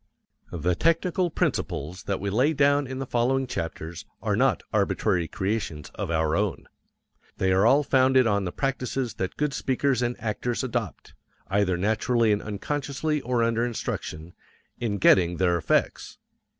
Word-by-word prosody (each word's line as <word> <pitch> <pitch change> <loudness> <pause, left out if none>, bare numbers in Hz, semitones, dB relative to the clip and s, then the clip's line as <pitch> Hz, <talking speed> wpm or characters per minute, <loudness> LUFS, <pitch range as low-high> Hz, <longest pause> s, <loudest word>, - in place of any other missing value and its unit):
The 90 +1 0
technical 170 - +1
principles 90 - -2
that 100 - -1
we 100 +1 -3
lay 130 +9 +3
down 145 -1 +3
in 130 +1 -5
the 135 - -3
following 130 +2 +1
chapters 80 -6 -5 0.2
are - - 0
not - - +2
arbitrary 85 -2 +1
creations 95 -7 -3
of - - -4
our 80 -1 +1
own. 100 -1 -1 0.7
They 95 0 +1
are 95 +4 +4
all 140 +4 +5
founded 130 -1 +4
on 100 -3 +1
the 90 - -3
practices 130 -1 -2
that 95 -1 -3
good 150 -1 0
speakers 130 -1 0
and 120 0 -1
actors 115 +2 -2
adopt 130 - -4 0.4
either 95 -2 +1
naturally 110 +4 +2
and 105 - +1
unconsciously 145 +7 -2
or 120 -2 0
under 115 0 +1
instruction 90 -8 -4 0.5
in 110 -4 -1
getting 90 -2 +4
their 90 -2 +2
effects. 80 -2 0
115 Hz, 150 wpm, -26 LUFS, 95-135 Hz, 0.7 s, all